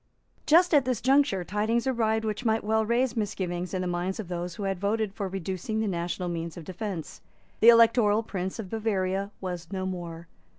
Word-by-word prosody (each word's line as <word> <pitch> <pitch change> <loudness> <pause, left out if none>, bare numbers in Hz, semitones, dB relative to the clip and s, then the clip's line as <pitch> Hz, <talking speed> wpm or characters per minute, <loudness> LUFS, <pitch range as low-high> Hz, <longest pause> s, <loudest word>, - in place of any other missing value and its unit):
Just 345 +3 +5
at 290 -3 +6
this 255 -3 -1
juncture 265 -6 +3
tidings 215 +6 0
arrived 220 -4 +1
which 215 +2 -3
might 220 -1 +1
well 220 +1 +2
raise 235 +2 +1
misgivings 185 -5 -2
in 185 - -2
the 180 - -2
minds 180 +3 -2
of 200 -5 -6
those 175 0 -4
who 205 - -6
had 195 -2 -1
voted 205 +1 0
for 200 -2 -3
reducing 190 +3 -3
the 220 - 0
national 175 0 -2
means 165 -1 -4
of 170 - -7
defence. 185 -3 -6 0.4
The 230 - +8
Electoral 230 -2 +5
Prince 190 -3 -4
of 205 -5 -7
Bavaria 200 -3 -1
was 180 -3 -5
no 190 -1 -3
more. 170 -2 -6
200 Hz, 195 wpm, -27 LUFS, 180-225 Hz, 0.4 s, The